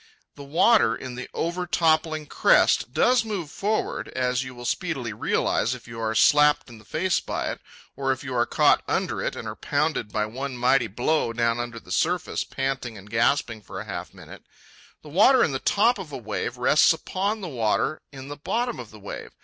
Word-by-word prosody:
The 145 - -11
water 155 - +4
in 130 0 -7
the 125 +1 -7
overtoppling 165 -2 0
crest 120 - +3
does 245 - +3
move 195 -9 -4
forward, 215 +2 -2
as 125 0 -1
you 130 -1 -9
will 120 0 -9
speedily 135 -7 -2
realize 115 +3 0
if 125 - -13
you 115 -1 -8
are 110 0 -1
slapped 150 +2 +4
in 115 - -12
the 110 - -18
face 180 +2 0
by - - -3
it, - - -8 0.3
or 135 0 0
if 130 +1 -3
you 130 -2 -5
are 120 -1 +1
caught - - +4
under - - -1
it - - -2
and - - -6
are - - -5
pounded 105 - -1
by 105 - 0
one 130 +4 -5
mighty 125 0 +3
blow 120 +4 0
down 115 0 +1
under 120 -1 -5
the 90 - -14
surface 175 - 0
panting 135 -4 -3
and 100 +1 -13
gasping 115 -1 +1
for - - -7
half - - -6
a - - -24
minute. - - -12 0.6
The 155 - -11
water 215 - +5
in - - +1
the 135 - -2
top 220 - +2
of 175 -6 -8
a - - -5
wave 120 +1 -4
rests 125 +4 +5
upon 200 +6 -2
the 185 - -4
water 125 +3 0
in 135 -1 -9
the 145 0 -7
bottom 240 +10 -2
of 115 - -8
the 110 - -14
wave. 100 - -7
135 Hz, 205 wpm, -25 LUFS, 120-165 Hz, 0.6 s, water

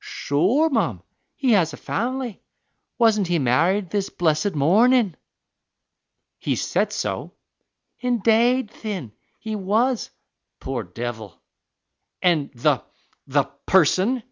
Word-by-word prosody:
"Sure, 195 - +1
mum, 125 - 0 0.3
he 265 -3 +1
has 170 -7 +3
a - - -8
family; 245 -1 -3 0.6
wasn't 220 -5 +3
he 175 0 +1
married 165 +8 +1
this 200 -2 -1
blessed 165 +3 0
mornin'?" 205 - +4 1.2
"He - - -1
said - - 0
so." - - -4 0.7
"Indade, 240 0 +2
thin, 195 - -6 0.3
he 220 -1 -4
was 215 +5 0
the - - -32 0.5
pore 130 -3 -2
divil!" 110 0 -7 0.8
"And 165 -6 +1
the 120 - +1 0.5
the - - +2 0.2
person?" 190 - +3
195 Hz, 110 wpm, -23 LUFS, 150-235 Hz, 1.2 s, mornin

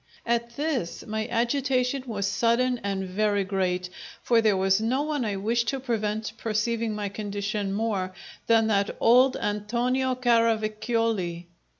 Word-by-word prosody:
At 235 0 -1
this, 285 - -2
my 220 +1 -3
agitation 255 +2 0
was 205 -4 -2
sudden 240 +4 +1
and 195 -2 -2
very 205 +1 +1
great, 185 -2 -1 0.3
for 235 -2 +4
there 215 -3 +3
was 190 +2 +2
no 255 +6 +1
one 300 -3 -1
I 210 -3 -1
wished 230 +4 0
to 270 +2 -1
prevent 220 -3 -2
perceiving 225 0 -1
my 210 -1 -2
condition 205 0 -3
more 200 -3 -1 0.4
than 225 -1 +4
that 200 -2 0
old 250 +3 +5
Antonio 245 +5 0
Caravacioli! 225 -6 +1
220 Hz, 135 wpm, -26 LUFS, 205-240 Hz, 0.4 s, old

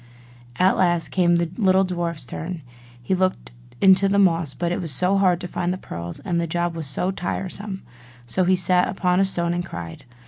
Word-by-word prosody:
At 185 +1 +3
last 175 -3 +1
came 175 -2 +3
the 170 -1 0
little 190 -2 +4
dwarf's 170 -5 -3
turn; 150 +6 -6
and 180 -3 -5 0.4
he 155 - -1
looked 185 0 -1 0.3
in 190 -1 +8
the 195 +1 +2
moss; 165 -7 +2
but 170 0 -2
it 175 - -2
was 165 -4 -3
so 185 +8 +2
hard 180 -3 +3
to 180 - -4
find 175 0 -2
the 185 - -3
pearls, 85 - -7
and 175 -4 -1
the 170 - -2
job 175 +1 -1
was 160 -3 -5
so 180 +7 -1
tiresome! 190 +2 -4 0.4
so 150 +11 0
he 185 +1 +3
sat 180 0 +3
down - - -3
upon 180 -1 +1
a 195 - +4
stone 170 -2 -1
and 175 0 -2
cried. 85 - -8
180 Hz, 215 wpm, -23 LUFS, 170-185 Hz, 0.4 s, in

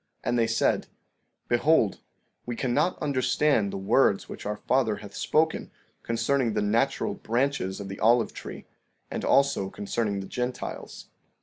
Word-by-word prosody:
15:7 - - -2
And 120 - +2
they 115 - +3
said: 115 - +1 0.6
Behold, 120 -3 +3 0.5
we 120 - -3
cannot 140 +9 +1
understand 135 -5 +2
the - - -4
words 95 +1 +2
which - - -7
our 105 - -2
father 125 -5 +1
hath 100 0 -11
spoken 160 +1 +1 0.3
concerning 115 +1 0
the - - 0
natural 110 +3 +1
branches 120 -5 -1
of 100 - -6
the 95 0 -7
olive 115 +1 +3
tree, - - -8 0.5
and - - -3
also 135 -8 +3
concerning 105 0 -2
the 95 - -5
Gentiles. 125 +4 -5
115 Hz, 145 wpm, -27 LUFS, 105-135 Hz, 0.6 s, they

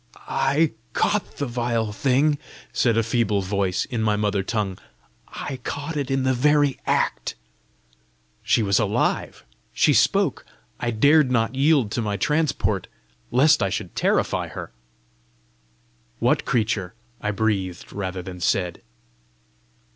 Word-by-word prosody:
"I 145 +3 +2 0.2
caught 210 -1 0
the 145 - -1
vile 120 -3 -1
thing," 140 +6 +2 0.3
said 115 -3 +2
a 115 - +3
feeble 110 -3 +1
voice, 95 -1 0
in 120 -4 -3
my 105 -1 +2
mother 105 -1 0
tongue; 100 -2 -2 0.5
"I 135 - -6
caught 145 +3 -4
it 140 -3 -2
in 135 -1 +1
the 130 0 +2
very 145 +2 +2
act!" - - 0 1.1
She 115 - +2
was 100 -1 +2
alive! 105 -1 -1 0.3
she - - +4
spoke! - - +2 0.4
I 120 - -1
dared 140 +5 +4
not 115 -1 +1
yield 135 -4 +3
to 120 - -1
my 105 -2 -2
transport 150 +4 0 0.4
lest 150 +2 +4
I 100 - +2
should - - -4
terrify - - +1
her. - - -8 1.5
"What - - +1
creature?" 110 -5 -1 0.3
I 105 - -1
breathed, 100 -4 -2
rather 95 -2 -4
than 90 0 -8
said. 90 -1 0
115 Hz, 130 wpm, -23 LUFS, 100-135 Hz, 1.5 s, she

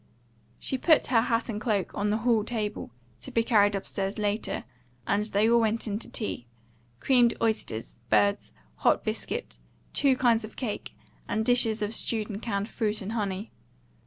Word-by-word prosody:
She 265 - -2
put 315 +1 +4
her 225 - +6
hat 230 -1 0
and 210 -3 -4
cloak 210 -6 0
on 205 +1 -1
the 210 - +2
hall 230 -3 +3
table, 215 - -3 0.3
to - - -9
be 230 - +1
carried 205 -3 +4
upstairs 195 0 -3
later, 210 0 -1 0.4
and 200 +1 +1
they 210 0 +2
all 235 +1 +5
went 225 0 0
in 210 -1 -2
to - - -8
tea: 165 - -3 0.5
creamed 245 -3 +4
oysters, 165 - -2
birds, 105 -2 +2 0.3
hot - - +2
biscuit, 60 - -4 0.3
two 275 -2 +3
kinds 235 -3 +3
of 215 - -9
cake, 235 -6 -4 0.3
and 220 +1 -1
dishes 230 -3 +3
of 210 +2 -2
stewed 220 -1 0
and 205 +1 -6
canned 205 -3 -2
fruit 215 -4 -2
and 200 - -5
honey. 205 -2 -3
215 Hz, 170 wpm, -27 LUFS, 205-230 Hz, 0.5 s, her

